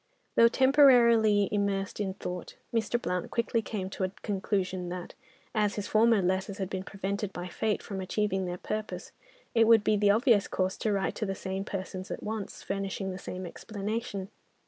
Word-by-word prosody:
Though 230 - +8
temporarily 235 -6 +5
immersed 200 -1 -1
in 190 -2 -2
thought, 180 -3 -6 0.2
Mr. 230 +1 +1
Blount 180 -6 -2
quickly 230 0 0
came 205 -4 -4
to - - -6
the - - -11
conclusion 190 -3 -1
that, 180 0 -6 0.4
as 210 -1 +1
his 205 -1 -3
former 220 -2 +4
letters 190 +2 0
had 190 -1 -4
been 190 - -2
prevented 195 +1 -3
by 175 -1 -5
fate 215 +3 -1
from 195 -2 -5
achieving 190 0 0
their 175 0 -3
purpose, 215 +3 -5 0.4
it 225 -1 +5
would 225 -2 +6
be 215 - +3
the 205 0 +3
obvious 220 -1 +4
course 185 0 -1
to 215 - 0
write 195 -1 0
to 215 - -2
the 195 - -2
same 190 +1 -4
persons 190 -1 -5
at - - -5
once, 215 -2 -5
furnishing 195 0 -3
the 185 - -6
same 185 0 -6
explanation. 205 +1 -4
200 Hz, 180 wpm, -29 LUFS, 190-220 Hz, 0.4 s, Though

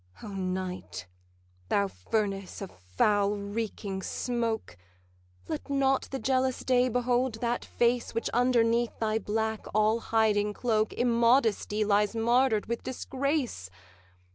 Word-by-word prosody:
'O 215 - -6
Night, 185 - -4 0.6
thou 100 - +2
furnace 195 - -3
of 195 - -7
foul 200 - +1
reeking 200 -1 -4
smoke, 230 +1 -2 0.7
Let - - -5
not 270 -1 +2
the 270 - -3
jealous 260 -1 0
Day 255 -1 +3
behold 245 0 +1
that 235 +1 -2
face 240 0 0
Which 230 - -1
underneath 235 -1 +2
thy 220 0 0
black 220 +1 -2
all 215 +2 +3
hiding 210 -2 +1
cloak 220 -3 +1
Immodesty 230 -3 +2
lies 205 +1 +2
martyr'd 235 0 +2
with 235 +1 -3
disgrace! 260 - -2
225 Hz, 115 wpm, -29 LUFS, 205-245 Hz, 0.7 s, Day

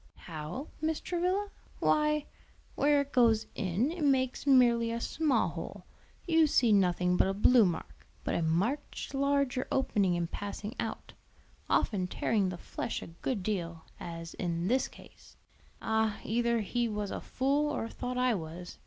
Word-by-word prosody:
"How, 165 - -7
Mrs. 315 0 -1
Travilla? 365 +3 0 0.3
Why, 300 -1 +2 0.5
where 290 0 +3
it 280 0 -6
goes 230 -3 +4
in 205 - 0
it 340 -2 -4
makes 265 -1 +1
merely 240 -4 +5
a 230 - -2
small 300 +4 +1
hole; - - -7 0.4
you 325 -2 +5
see 240 -6 +4
nothing 180 -2 +3
but - - +4
a 195 - -1
blue 230 +2 +6
mark; 170 - -6 0.2
but - - -1
a - - 0
much 190 - -1
larger 280 -2 +1
opening 200 -8 +2
in 175 0 0
passing 205 +4 -5
out, - - -4 0.6
often 190 -4 +1
tearing 200 +1 0
the 180 - -5
flesh - - -4
a - - -8
good 235 -8 -1
deal; 170 -5 -3 0.2
as 165 -1 -7
in 170 0 -2
this 255 +5 +2
case. - - -17 0.5
"Ah, 220 -1 +1
either 235 +1 +1
he 240 +3 -1
was 210 -1 -3
a - - -4
fool 280 +3 0
or 270 -6 -2
thought 250 +2 -5
I 250 -1 +3
was. 175 -1 -6
230 Hz, 160 wpm, -31 LUFS, 185-275 Hz, 0.6 s, blue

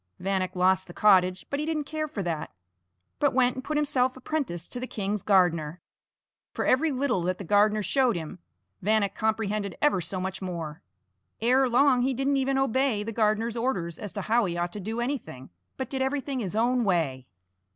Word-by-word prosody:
Vanek 190 -1 -1
lost 185 +1 +2
the 175 - -11
cottage, 185 -3 +4
but 280 - -1
he 300 - -1
didn't 310 -2 -1
care 310 +1 -3
for 210 -9 -4
that, 165 -3 -3 0.7
but 290 -3 +2
went 250 -1 +4
and 260 - -6
put 305 +2 -2
himself 260 -3 +1
apprentice 255 - -3
to 245 - -6
the 255 - -4
king's 205 -2 -2
gardener. 175 -5 +2 0.8
For - - -1
every 305 +5 +3
little 260 -7 0
that 180 +1 -1
the 200 - -7
gardener 210 +3 +3
showed 255 +2 +2
him, 165 +1 -6 0.4
Vanek 205 0 +2
comprehended 215 -3 -1
ever 295 -11 +2
so 185 +3 -4
much 190 +1 -4
more. 170 -3 -5 0.6
Ere 255 +3 +3
long 255 +1 +4
he 260 +1 +1
didn't 275 +2 +1
even 270 0 +1
obey 260 -4 +1
the 225 - -4
gardener's 220 +1 +1
orders 200 -9 -2
as 205 - -6
to 200 - -3
how 230 +2 +2
he 175 -2 -3
ought 175 0 -2
to 210 - -5
do 220 +4 -3
anything, 240 - -5 0.3
but 260 - -3
did 265 -1 -2
everything 270 0 -1
his 200 -4 -3
own 240 +2 +2
way. 155 - 0
215 Hz, 195 wpm, -27 LUFS, 185-260 Hz, 0.8 s, cottage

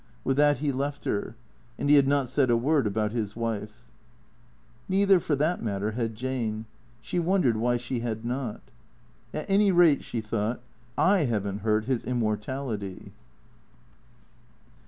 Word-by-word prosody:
With 135 - +1
that 145 0 +4
he 145 +2 0
left 140 +2 -3
her. 105 +2 -2 0.4
And - - -2
he 145 - +7
had 140 -2 +5
not 140 -2 +2
said 130 +1 +1
a 120 - +4
word 140 +1 +2
about 105 +1 -1
his 110 -3 -3
wife. 110 -2 -4 1.1
Neither 195 0 +4
for 155 -3 0
that 155 +5 0
matter 105 -1 -2
had 115 -1 -3
Jane. 115 -3 -3 0.4
She 180 - -2
wondered 170 - +2
why 120 +2 +1
she 120 +1 -3
had 115 -1 -4
not. 125 -2 -3 0.4
" - - -33
At 155 - -5
any 200 0 +4
rate/' 170 -5 +5
she 120 - -4
thought, 110 +1 -2 0.3
'" 115 - -32
I 185 -4 +4
have 110 -5 -1
n't 100 +1 -4
hurt 110 0 +1
his 130 -2 -1
immortality." 110 -3 -3
120 Hz, 160 wpm, -27 LUFS, 110-145 Hz, 1.1 s, he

